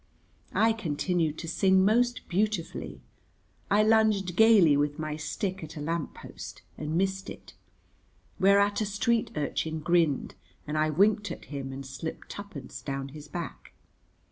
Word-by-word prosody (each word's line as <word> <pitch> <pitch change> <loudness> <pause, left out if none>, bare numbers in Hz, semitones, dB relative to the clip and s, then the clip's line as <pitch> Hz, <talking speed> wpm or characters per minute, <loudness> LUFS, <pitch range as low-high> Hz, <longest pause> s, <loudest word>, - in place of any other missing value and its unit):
I 225 0 +4
continued 165 -4 -1
to 165 - -6
sing 190 +2 +3
most 240 +4 +2
beautifully. 200 -1 -2 0.7
I 210 +1 +4
lunged 215 -5 +3
gayly 205 -8 +6
with 145 +1 0
my 155 -1 -3
stick 185 +4 -3
at 155 0 -8
a - - -4
lamp 160 +1 -3
post - - -10
and 155 +1 -4
missed 190 +1 -1
it, - - -11 0.9
whereat 200 +2 +4
a - - +1
street 220 +3 +1
urchin 155 +1 -2
grinned, 160 -3 +1 0.3
and 150 - -4
I 155 0 +2
winked 205 +6 +3
at - - -7
him 135 -1 -4
and 135 +1 -7
slipped 135 +5 -7
twopence 200 -10 -8
down 135 -1 -4
his 150 +1 -10
back. 170 +3 -7
175 Hz, 145 wpm, -28 LUFS, 150-205 Hz, 0.9 s, gayly